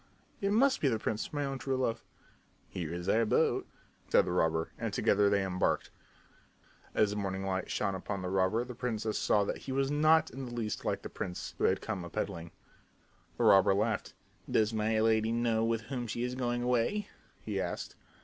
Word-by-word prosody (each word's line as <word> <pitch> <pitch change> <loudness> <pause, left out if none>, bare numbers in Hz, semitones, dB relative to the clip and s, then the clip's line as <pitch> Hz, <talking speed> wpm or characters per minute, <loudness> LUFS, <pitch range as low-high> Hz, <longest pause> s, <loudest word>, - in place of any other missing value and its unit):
"It 200 0 +1
must 260 +5 +3
be 145 - +3
the 115 -4 +2
prince, 110 0 -3
my 145 -1 -1
own 135 -1 -3
true 135 -1 -1
love." 125 -3 -1 0.7
"Here 85 -4 -4
is 85 +1 -5
our 115 +3 +3
boat," 110 - +2 0.4
said - - +5
the - - -2
robber, 80 -2 +1
and - - -2
together 100 0 +3
they 100 -1 +2
embarked. 90 -1 0 1.0
As 105 -2 +3
the 105 - -3
morning 95 -1 -2
light 95 -1 -2
shone 100 -2 0
upon 95 0 -4
the 90 - -2
robber 95 +5 +2
the 125 - -7
princess 110 -3 -2
saw 105 - +3
that - - -2
he - - -1
was 135 +1 +1
not 155 +2 +4
in 135 +3 -6
the 120 - -7
least 110 -3 -3
like - - -1
the - - -6
prince 90 - -5
who - - +2
had 95 - +2
come 100 -5 -4
a 85 - -7
peddling. 85 -4 -4 0.9
The - - 0
robber 95 0 +6
laughed. 105 +1 -1 0.3
"Does 110 0 +2
my 110 0 +1
lady 110 0 +3
know 115 -1 +1
with 115 0 +1
whom 120 +2 -4
she 120 +2 -3
is 125 0 -2
going 120 -1 -1
away?" 125 - +1 0.3
he - - -3
asked. - - -4
110 Hz, 200 wpm, -31 LUFS, 95-125 Hz, 1.0 s, robber